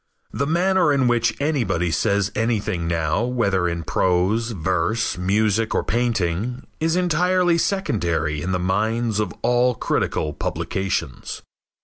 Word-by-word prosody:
The 140 Hz, -, -1 dB
manner 175 Hz, 0 st, +3 dB
in 135 Hz, -3 st, +2 dB
which 115 Hz, -2 st, +1 dB
anybody 110 Hz, -, 0 dB
says 100 Hz, +2 st, +1 dB
anything 110 Hz, -6 st, -1 dB
now 80 Hz, +1 st, 0 dB
whether 100 Hz, -8 st, +1 dB
in 85 Hz, -1 st, -3 dB
prose, 95 Hz, +8 st, +1 dB
verse, 95 Hz, +3 st, -1 dB
music 105 Hz, +4 st, +1 dB
or -, -, +1 dB
painting 115 Hz, -1 st, -1 dB
is 160 Hz, +1 st, +1 dB
entirely 180 Hz, 0 st, +2 dB
secondary 85 Hz, -, -1 dB
in 90 Hz, +4 st, -2 dB
the 90 Hz, -, +1 dB
minds 110 Hz, +5 st, 0 dB
of 105 Hz, -, -1 dB
all 125 Hz, +1 st, +3 dB
critical 75 Hz, -7 st, -1 dB
publications. 80 Hz, -4 st, -3 dB
110 Hz, 125 wpm, -22 LUFS, 90-125 Hz, -, manner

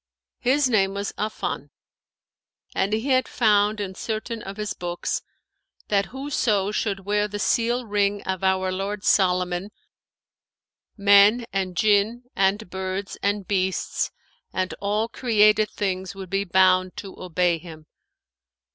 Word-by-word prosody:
His 265 Hz, +3 st, +3 dB
name 195 Hz, -5 st, +2 dB
was 200 Hz, 0 st, -3 dB
Affan; 215 Hz, +1 st, -3 dB, 1.0 s
and 195 Hz, +2 st, 0 dB
he 220 Hz, +6 st, -1 dB
had 255 Hz, -2 st, +3 dB
found 210 Hz, -2 st, +2 dB
in 195 Hz, -2 st, -4 dB
certain 220 Hz, +3 st, -4 dB
of 195 Hz, +1 st, -8 dB
his 210 Hz, -1 st, -3 dB
books, 175 Hz, 0 st, -3 dB, 0.7 s
that 200 Hz, -1 st, +2 dB
whoso 235 Hz, -7 st, 0 dB
should 200 Hz, -2 st, -1 dB
wear 205 Hz, +2 st, 0 dB
the 205 Hz, 0 st, -5 dB
seal 235 Hz, +3 st, +1 dB
ring 205 Hz, -1 st, 0 dB
of 190 Hz, -1 st, -3 dB
our 190 Hz, 0 st, +2 dB
lord 195 Hz, +2 st, -3 dB
Solomon, 180 Hz, 0 st, +2 dB, 1.3 s
men 205 Hz, +3 st, +6 dB
and 185 Hz, -2 st, -2 dB
Jinn 215 Hz, +3 st, +2 dB
and 195 Hz, +2 st, +1 dB
birds 190 Hz, +1 st, -4 dB
and 200 Hz, -1 st, -1 dB
beasts 190 Hz, -2 st, 0 dB, 0.4 s
and 185 Hz, 0 st, -2 dB
all 210 Hz, +2 st, 0 dB
created 215 Hz, -3 st, +3 dB
things 190 Hz, -1 st, -3 dB
would 190 Hz, -2 st, -9 dB
be 195 Hz, +1 st, 0 dB
bound 185 Hz, 0 st, +3 dB
to 195 Hz, -, -8 dB
obey 175 Hz, -1 st, +1 dB
him. 160 Hz, -2 st, -12 dB
200 Hz, 130 wpm, -24 LUFS, 190-215 Hz, 1.3 s, men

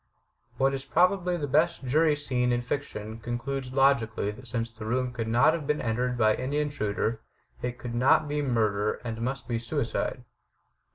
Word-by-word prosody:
What 135 Hz, +1 st, +2 dB
is 135 Hz, -1 st, -3 dB
probably 180 Hz, +2 st, +2 dB
the 150 Hz, -, -2 dB
best 155 Hz, +1 st, +2 dB
jury 155 Hz, +4 st, +3 dB
scene 125 Hz, -4 st, 0 dB
in 120 Hz, 0 st, 0 dB
fiction 115 Hz, -4 st, -4 dB
concludes 125 Hz, +3 st, -4 dB
logically 120 Hz, -6 st, +2 dB
that 125 Hz, +5 st, -11 dB
since 115 Hz, -1 st, -2 dB
the 115 Hz, -1 st, -10 dB
room 125 Hz, +3 st, -1 dB
could 115 Hz, -3 st, -3 dB
not 120 Hz, +7 st, +4 dB
have 160 Hz, -4 st, -4 dB
been 150 Hz, -, +1 dB
entered 125 Hz, +2 st, -1 dB
by 110 Hz, -2 st, +4 dB
any 130 Hz, +5 st, -2 dB
intruder 115 Hz, -6 st, -1 dB, 0.4 s
it 125 Hz, 0 st, -3 dB
could 120 Hz, -1 st, -6 dB
not 135 Hz, +5 st, +4 dB
be 145 Hz, 0 st, -1 dB
murder 110 Hz, -6 st, +1 dB
and 115 Hz, -1 st, -4 dB
must 125 Hz, 0 st, -3 dB
be 115 Hz, -1 st, -1 dB
suicide. 115 Hz, -1 st, -2 dB
125 Hz, 175 wpm, -28 LUFS, 115-140 Hz, 0.4 s, not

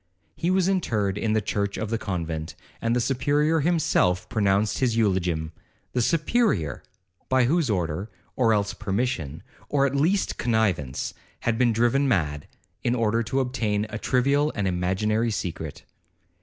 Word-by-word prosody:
He 170 Hz, -, -1 dB
was 185 Hz, -1 st, +3 dB
interred 110 Hz, -, 0 dB
in 110 Hz, +1 st, 0 dB
the 110 Hz, -, +2 dB
church 100 Hz, 0 st, -1 dB
of 110 Hz, 0 st, -3 dB
the 115 Hz, -, 0 dB
convent, 80 Hz, -5 st, -4 dB, 0.3 s
and 115 Hz, +1 st, +1 dB
the -, -, +2 dB
Superior 145 Hz, +5 st, +2 dB
himself 140 Hz, -, +2 dB
pronounced 105 Hz, 0 st, +1 dB
his 120 Hz, -4 st, +1 dB
eulogium—the 90 Hz, +2 st, -2 dB
Superior! 150 Hz, -, +1 dB, 0.5 s
by 130 Hz, -1 st, +4 dB
whose 150 Hz, +2 st, +2 dB
order, 90 Hz, 0 st, -1 dB, 0.3 s
or 115 Hz, -3 st, +3 dB
else 100 Hz, -2 st, +1 dB
permission, 100 Hz, -, -2 dB, 0.3 s
or 140 Hz, -1 st, +3 dB
at 135 Hz, -, 0 dB
least 175 Hz, +8 st, +1 dB
connivance, 100 Hz, -, 0 dB
he -, -, -29 dB, 0.2 s
had 115 Hz, 0 st, 0 dB
been 120 Hz, -2 st, +4 dB
driven 120 Hz, +5 st, +2 dB
mad, 75 Hz, -, 0 dB, 0.4 s
in 120 Hz, -, +1 dB
order 115 Hz, -1 st, +1 dB
to 130 Hz, +4 st, 0 dB
obtain 110 Hz, -5 st, -1 dB
a -, -, -4 dB
trivial 140 Hz, +4 st, +2 dB
and 100 Hz, -2 st, 0 dB
imaginary 95 Hz, +6 st, 0 dB
secret. 80 Hz, -7 st, -4 dB
110 Hz, 150 wpm, -25 LUFS, 95-130 Hz, 0.5 s, by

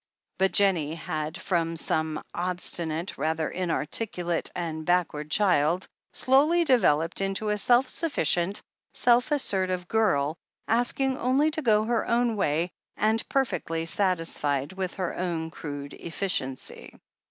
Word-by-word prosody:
But 190 Hz, 0 st, +3 dB
Jennie 170 Hz, -6 st, +2 dB
had, 155 Hz, -2 st, -4 dB
from 165 Hz, -2 st, 0 dB, 0.2 s
an 155 Hz, -1 st, 0 dB
obstinate, 175 Hz, -1 st, -2 dB
rather 160 Hz, 0 st, 0 dB
inarticulate, 175 Hz, 0 st, -2 dB
and 160 Hz, -2 st, -3 dB
backward 155 Hz, -3 st, 0 dB
child, 180 Hz, -2 st, +2 dB, 0.2 s
slowly 300 Hz, +7 st, +4 dB
developed 180 Hz, -, +3 dB
into 195 Hz, +2 st, -1 dB
a 210 Hz, -, +1 dB
self 245 Hz, +5 st, +4 dB
sufficient, 200 Hz, -, 0 dB, 0.3 s
self 245 Hz, +4 st, +3 dB
assertive 185 Hz, -10 st, 0 dB
girl, 165 Hz, -9 st, +1 dB, 0.3 s
asking 255 Hz, +3 st, +1 dB
only 270 Hz, +5 st, +2 dB
to 315 Hz, 0 st, -2 dB
go 215 Hz, -5 st, +3 dB
her 230 Hz, 0 st, 0 dB
own 235 Hz, -1 st, +2 dB
way, 170 Hz, -2 st, 0 dB, 0.3 s
and 220 Hz, +1 st, +2 dB
perfectly 165 Hz, -11 st, -1 dB
satisfied 165 Hz, -6 st, 0 dB
with 190 Hz, -1 st, -4 dB
her 185 Hz, -3 st, -3 dB
own 165 Hz, -3 st, -2 dB
crude 145 Hz, -3 st, -7 dB
efficiency. 165 Hz, -7 st, -4 dB
180 Hz, 120 wpm, -27 LUFS, 160-220 Hz, 0.3 s, slowly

